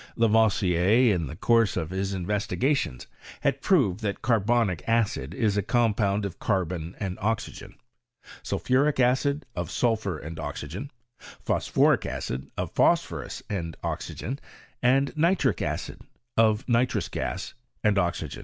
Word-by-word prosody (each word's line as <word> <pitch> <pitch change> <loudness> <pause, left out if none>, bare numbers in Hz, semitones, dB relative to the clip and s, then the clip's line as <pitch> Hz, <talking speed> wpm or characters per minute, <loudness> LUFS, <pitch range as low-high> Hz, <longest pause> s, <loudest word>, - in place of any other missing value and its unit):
Lavoisier, 110 -1 +3
in 85 -4 -1
the 65 - -7
course 115 +2 +3
of 80 +1 -3
his 95 +1 -2
investigations, 105 - -1 0.4
had - - 0
proved 95 +1 +3
that 105 -3 -3
carbonic 115 -5 +2
acid 115 - +1
is 105 -2 +1
a - - +3
compound 105 -2 +1
of 100 -2 -6
carbon 90 -4 -1
and 95 -3 -4
oxygen; 110 +2 -3 0.7
sulphuric 140 +3 +1
acid, 135 +4 +2
of - - -3
sulphur 110 -7 0
and 80 +2 -8
oxygen; 80 - -5 0.5
phosphoric - - +2
acid, 65 +2 -4
of - - -3
phosphorus - - +1
and 85 -5 -4
oxygen; 135 +4 -4 0.4
and 135 +4 +2
nitric 170 +4 +2
acid, - - -3 0.3
of 110 0 +3
nitrous 120 0 +1
gas - - -4 0.3
and 105 -2 +3
oxygen. 85 -6 -2
105 Hz, 125 wpm, -26 LUFS, 90-120 Hz, 0.7 s, Lavoisier